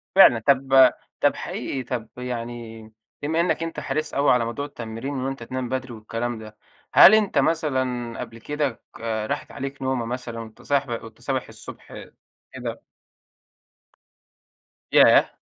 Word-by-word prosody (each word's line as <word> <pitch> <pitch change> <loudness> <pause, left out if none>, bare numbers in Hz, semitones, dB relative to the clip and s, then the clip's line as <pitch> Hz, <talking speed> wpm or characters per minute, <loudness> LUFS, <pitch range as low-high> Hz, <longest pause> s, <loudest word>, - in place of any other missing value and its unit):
فعلًا، 125 -12 +8
طَب 135 0 +5 0.3
طَب - - +3
حقيقي 130 - -4
طَب 120 -2 -4
يعني 120 -2 -6 0.4
بما 160 +3 0
إنَّك 170 -1 0
أنت 165 - -4
حريص 155 0 -2
أوي 140 +1 +3
على 125 -2 +3
موضوع 130 +5 -3
التمرين 115 +1 -6
وإن 130 0 -2
أنت 135 -3 -5
تنام 130 +1 -4
بدري 130 -1 -3
والكلام 115 +2 -4
ده، 110 -1 -11 0.4
هل 215 - +10
أنت 210 -8 +1
مثلًا 130 -6 0
قبل 115 -1 -7
كده 145 0 -2 0.2
راحت 115 +4 -3
عليك 135 0 -6
نومة 130 -3 -1
مثلًا 120 -1 -5
وأنت 110 -1 -10
صاحب 140 -2 0
وأنت 115 +1 -13
صابح 130 0 -2
الصُبح 110 -1 -10 0.5
كده؟ - - -6 2.1
ياه! - - +6
125 Hz, 140 wpm, -24 LUFS, 115-140 Hz, 2.1 s, هل